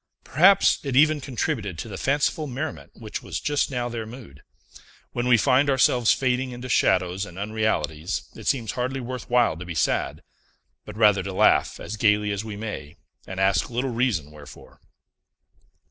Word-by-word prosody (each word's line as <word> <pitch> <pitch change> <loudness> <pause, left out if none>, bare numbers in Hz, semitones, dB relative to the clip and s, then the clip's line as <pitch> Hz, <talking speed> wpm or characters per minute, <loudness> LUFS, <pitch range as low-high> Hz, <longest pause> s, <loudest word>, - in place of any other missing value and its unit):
Perhaps 185 +7 +4
it 135 -3 -3
even 150 +2 +4
contributed 120 - -3
to 100 - -6
the 105 - -7
fanciful 145 - 0
merriment 140 +4 -5
which 110 -2 -7
was - - -5
just 145 -1 0
now 125 -3 -2
their 115 -2 -5
mood. 110 - -12 0.7
When 120 0 -2
we 125 -1 +6
find 135 +4 +3
ourselves 125 -3 +3
fading 130 0 0
into 125 +1 -8
shadows 95 -3 +2
and 95 -3 -9
unrealities, 100 -7 -2
it - - -9
seems 115 -5 0
hardly 130 +2 -3
worth 125 0 -6
while 120 -8 +3
to 90 - -7
be 85 -2 -7
sad, - - -1 0.6
but 105 0 -9
rather 105 -3 +4
to 95 +1 -5
laugh - - +3
as 110 - -6
gayly 105 -1 +2
as 100 +1 -3
we 110 -2 -7
may, 100 -8 -6 0.3
and 95 0 -6
ask 95 +4 +2
little 125 +2 -2
reason 115 - -1
wherefore. 75 -2 -14
115 Hz, 170 wpm, -24 LUFS, 100-130 Hz, 0.7 s, we